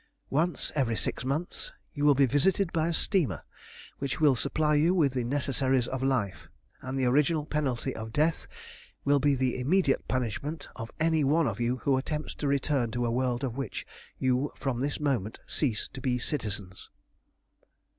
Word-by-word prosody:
Once 165 +5 0
every 130 -6 +1
six - - -3
months 160 - -3 0.2
you 145 - -3
will 145 -1 +6
be 140 +1 +5
visited 165 +8 +2
by 160 -1 +1
a - - 0
steamer, 175 -2 +1 0.6
which 140 -2 -2
will 150 -3 +6
supply 150 +5 0
you 160 +5 +4
with 145 -7 +3
the 125 -2 0
necessaries 130 -1 +1
of 130 -1 -3
life, 125 -8 -1 0.3
and 130 +1 -4
the 130 - +1
original 150 +4 +3
penalty 135 -4 -1
of 110 0 -6
death 155 +6 +1 0.6
will 140 0 +4
be 140 0 +3
the 130 -1 0
immediate 145 +2 +2
punishment 135 +5 -2
of 115 0 -6
any 160 -1 +3
one 155 +4 +3
of 110 -1 -3
you 120 +2 +1
who 135 -2 +3
attempts 150 +3 -3
to 145 - -3
return 140 -3 +1
to 120 +2 -1
a 115 - 0
world 125 +1 0
of 130 -2 -3
which 135 - -4 0.3
you 130 +2 +1
from 130 -4 -2
this 145 +2 -1
moment 130 -8 -1
cease 120 -9 -1
to 135 - -7
be 125 -3 +1
citizens." 105 -8 -4
135 Hz, 175 wpm, -29 LUFS, 125-150 Hz, 0.6 s, will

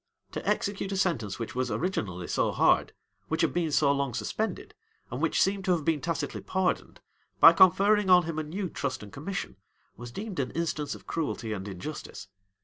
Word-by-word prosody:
To - - -5
execute 200 -1 -1
a 195 - -1
sentence 125 - 0
which 115 - -5
was 130 0 -1
originally 105 - -2
so - - +1
hard, - - +3 0.4
which - - -1
had - - +2
been 170 -3 0
so 145 -1 +4
long 140 -4 -1
suspended, 220 +1 -3 0.4
and - - -4
which - - +1
seemed 195 0 +2
to 185 - +3
have 160 -4 -2
been 160 -3 +1
tacitly 165 -4 -3
pardoned, 190 -1 -1 0.4
by 165 - +10
conferring 195 +3 +5
on 180 -1 +7
him 160 -1 -3
a - - -1
new 185 +6 -4
trust 140 -7 -4
and 100 - -12
commission, 190 +8 -5 0.4
was 120 +2 -8
deemed 200 - -5
an 130 -2 0
instance 155 -3 -2
of - - -14
cruelty 130 -8 -3
and 95 -1 -5
injustice. 100 +1 -7
160 Hz, 190 wpm, -28 LUFS, 125-185 Hz, 0.4 s, by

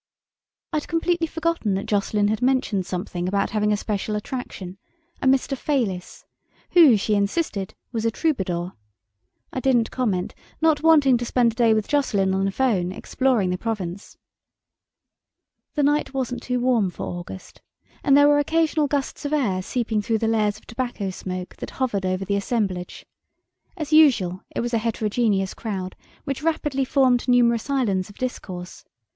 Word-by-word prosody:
I'd 305 -1 -1
completely 330 0 0
forgotten 325 - -1
that 195 - -3
Jocelyn 205 0 +1
had 220 +2 -1
mentioned 250 -8 +1
something 180 -1 -3
about 200 +1 0
having 210 0 +1
a 210 - +2
special 210 0 -2
attraction: 205 -5 -6 0.4
a - - +1
"Mr. 270 +1 +2
Fayliss", 235 -11 -2 0.5
who, 310 -10 +7
she 210 +2 0
insisted, 200 - -1 0.2
was 225 -3 -2
a 230 - +3
troubadour. 190 - -1 0.8
I - - -2
didn't 245 -3 +2
comment, 205 -8 -1 0.3
not 315 -2 +3
wanting 295 -6 +5
to 240 - -3
spend 235 -1 +2
a - - -15
day 230 -2 +4
with 215 -1 -1
Jocelyn 205 -10 +1
on 190 0 +1
the 195 - 0
phone, 195 -6 +1
exploring 230 -2 0
the 180 - -2
Provence. 200 -4 -5 1.6
The 295 - +2
night 290 -1 +1
wasn't 250 -2 -2
too 250 0 -1
warm 240 -6 +2
for 175 - -8
August, 175 +1 -8 0.4
and 280 -2 +5
there 285 0 +7
were 290 0 +5
occasional 315 0 +1
gusts 280 -1 -2
of 290 +1 -2
air 210 -11 +1
seeping 225 +1 -1
through 225 +2 0
the 225 - -1
layers 215 -2 +1
of - - -19
tobacco 230 -5 -3
smoke 185 0 -6
that - - -6
hovered 205 -8 0
over 185 +1 -1
the 200 +1 0
assemblage. 200 -4 -2 0.7
As 310 -2 -4
usual, 225 - +4
it - - -3
was 240 +1 -3
a 230 - +3
heterogeneous 215 -3 0
crowd, 190 -4 -5 0.3
which 275 0 -4
rapidly 295 -4 0
formed 255 -2 +2
numerous 240 -1 +3
islands 210 -9 0
of 205 - -14
discourse. 185 -8 -6
225 Hz, 165 wpm, -23 LUFS, 195-270 Hz, 1.6 s, who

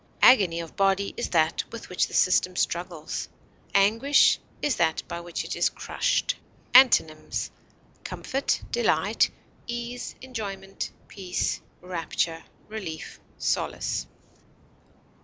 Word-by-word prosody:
Agony 190 -10 +6
of 165 -1 -7
body 195 0 +2
is - - -3
that 160 +1 +2
with 230 - -8
which 180 - +1
the - - -13
system 185 0 +3
struggles; 170 -3 -2 0.5
anguish 225 +9 +5 0.2
that 230 - +1
by 170 - -4
which 170 0 -4
it - - -4
is - - +3
crushed. - - 0 0.4
Antonyms: 240 -12 +5 0.5
comfort, 270 +1 -2
delight, 480 - +2 0.4
ease, 240 +1 -5
enjoyment, 205 -6 -5 0.2
peace, 185 -3 -2 0.2
rapture, 170 -2 -2 0.2
relief, 195 -7 -6 0.2
solace. - - -1
195 Hz, 100 wpm, -26 LUFS, 170-235 Hz, 0.5 s, Agony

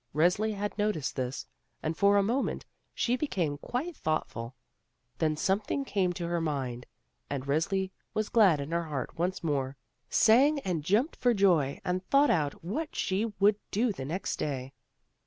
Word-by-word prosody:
Resli 180 +7 +2
had 205 +1 -3
noticed 205 -9 0
this, 130 0 -3 0.4
and 155 +1 -1
for 200 +2 +4
a 200 - +4
moment 240 +7 -1 0.3
she 245 - +1
became 175 - -1
quite 285 - -3
thoughtfxil. 130 - -3 0.7
Then 155 -1 +1
something 205 - 0
came 190 -7 +1
to 175 -1 -4
her 170 0 0
mind, 130 -6 -3 0.4
and 135 -1 -3
Resli 185 +7 0 0.2
was 215 -1 0
glad 195 -10 +5
in 140 +3 -5
her 170 0 0
heart 150 +1 -5
once 180 +2 -1
more, 140 -4 -1 0.3
sang 275 +7 +5
and 175 - -2
jumped 215 - +2
for 245 -2 +2
joy 170 -9 +3
and 180 +1 -1
thought 280 +1 +5
out 150 -3 0
what 300 - -3
she 195 +3 0
would 205 +1 +5
do 225 +3 +1
the 135 -9 -6
next 170 +7 -3
day. 135 -2 -3
180 Hz, 165 wpm, -29 LUFS, 150-215 Hz, 0.7 s, glad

